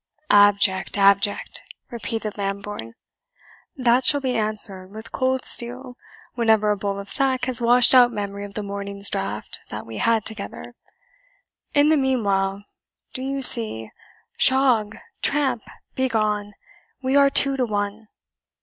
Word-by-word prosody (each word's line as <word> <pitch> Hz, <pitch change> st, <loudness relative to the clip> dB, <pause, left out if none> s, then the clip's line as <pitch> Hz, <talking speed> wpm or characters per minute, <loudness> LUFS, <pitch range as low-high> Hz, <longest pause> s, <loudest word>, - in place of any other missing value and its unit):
"Abject! 205 Hz, -1 st, +3 dB
abject!" 200 Hz, 0 st, +1 dB, 0.3 s
repeated 225 Hz, -2 st, -5 dB
Lambourne; 200 Hz, -, -6 dB, 0.8 s
"that 250 Hz, -2 st, +2 dB
shall 285 Hz, -, +5 dB
be 260 Hz, -2 st, -2 dB
answered 210 Hz, -4 st, -1 dB
with 215 Hz, +3 st, -11 dB
cold 260 Hz, 0 st, -1 dB
steel 250 Hz, +1 st, 0 dB, 0.4 s
whenever 220 Hz, -3 st, +2 dB
a -, -, +1 dB
bowl 200 Hz, 0 st, -4 dB
of 200 Hz, -, -9 dB
sack 260 Hz, +1 st, +1 dB
has 250 Hz, -2 st, 0 dB
washed 245 Hz, +1 st, +4 dB
out 245 Hz, -1 st, +6 dB
memory 200 Hz, -2 st, -5 dB
of 200 Hz, -1 st, -10 dB
the 210 Hz, -, -4 dB
morning's 200 Hz, 0 st, -2 dB
draught 105 Hz, -, -4 dB
that -, -, -7 dB
we 115 Hz, -1 st, -9 dB
had 230 Hz, -2 st, +1 dB
together. 220 Hz, +3 st, -6 dB, 1.0 s
In 290 Hz, +1 st, +4 dB
the 315 Hz, -, +3 dB
meanwhile, 200 Hz, -7 st, -1 dB, 0.5 s
do 260 Hz, -, -5 dB
you 270 Hz, +1 st, -3 dB
see, 215 Hz, -, +3 dB, 0.5 s
shog 250 Hz, -6 st, +3 dB, 0.2 s
tramp 265 Hz, -6 st, 0 dB, 0.3 s
begone 215 Hz, -5 st, -1 dB, 0.5 s
we 260 Hz, +1 st, 0 dB
are 280 Hz, 0 st, +5 dB
two 275 Hz, 0 st, +4 dB
to 260 Hz, -2 st, 0 dB
one." 205 Hz, +1 st, -4 dB
220 Hz, 135 wpm, -22 LUFS, 200-255 Hz, 1.0 s, out